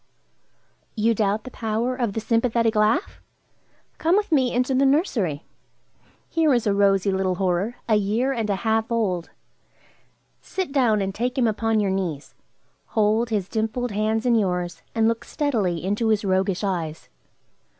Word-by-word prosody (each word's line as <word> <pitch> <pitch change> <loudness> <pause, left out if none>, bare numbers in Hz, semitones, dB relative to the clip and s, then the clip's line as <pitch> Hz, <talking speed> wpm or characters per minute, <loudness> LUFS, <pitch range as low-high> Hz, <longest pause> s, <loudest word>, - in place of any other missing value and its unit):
You 230 +1 +2
doubt 210 0 0
the 255 - -9
power 230 +3 -2
of 235 -5 -1
the 225 - -2
sympathetic 230 0 +1
laugh? 215 - +1 0.8
Come 335 +3 +3
with 415 -3 -1
me 260 -5 +3
into 250 +2 0
the 260 +1 +3
nursery. 260 - +1 0.8
Here 325 -2 +2
is 240 - 0
a 205 - +2
rosy 200 -1 +3
little 190 -1 0
horror, 190 +5 -1
a 215 -2 +4
year 220 +7 0
and 225 -4 -2
a 200 - +2
half 225 +1 +1
old. 190 -7 -1 1.1
Sit 375 -6 -4
down 235 -7 +2
and 195 0 -3
take 245 +5 -2
him 255 - +3
upon 225 0 +1
your 200 -2 +1
knees. 175 -7 -3 0.5
Hold 220 +2 +1
his 205 -5 -1
dimpled 225 +3 -2
hands 215 +2 0
in 245 - +3
yours, 180 -5 -1
and 225 -1 +3
look 230 0 -1
steadily 210 - -1
into 205 +4 0
his 215 -1 +1
roguish 190 0 0
eyes. 170 -5 -3
220 Hz, 160 wpm, -23 LUFS, 195-240 Hz, 1.1 s, a